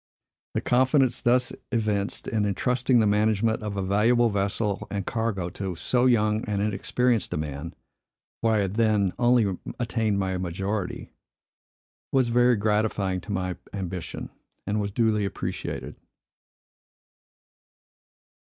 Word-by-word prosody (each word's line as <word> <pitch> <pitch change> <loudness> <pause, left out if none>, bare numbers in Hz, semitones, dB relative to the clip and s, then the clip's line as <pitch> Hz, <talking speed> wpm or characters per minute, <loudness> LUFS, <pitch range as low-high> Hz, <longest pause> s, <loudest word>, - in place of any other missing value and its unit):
The - - +1
confidence, 130 +1 +3
thus 125 +1 +2 0.2
evinced, 105 -4 0
in 110 -2 0
intrusting 125 +5 +1
the 110 - +4
management 110 +2 +2
of 105 -2 -4
a 100 - -1
valuable 115 +5 +3
vessel 100 +1 -1
and 100 -2 -3
cargo 110 -6 -1
to 95 0 -5
so 125 +9 +1
young 110 -3 +2
and 105 -1 -1
inexperienced 110 +2 0
a - - -1
man, 75 +2 -5 0.7
for 115 -1 +2
I 105 - +3
had 95 -1 -2
then 105 -4 +2
only 120 -6 +3 0.2
attained 115 -3 0
my 95 -1 -1
majority, 95 +2 -3 1.0
was 130 -3 +3
very 120 +1 +4
gratifying 105 -3 0
to 85 - -8
my 90 -2 -2 0.2
ambition, 90 -3 -5 0.3
and 105 +1 0
was 100 - -2
duly 110 0 +1
appreciated. 100 - -4
105 Hz, 125 wpm, -26 LUFS, 95-115 Hz, 1.0 s, the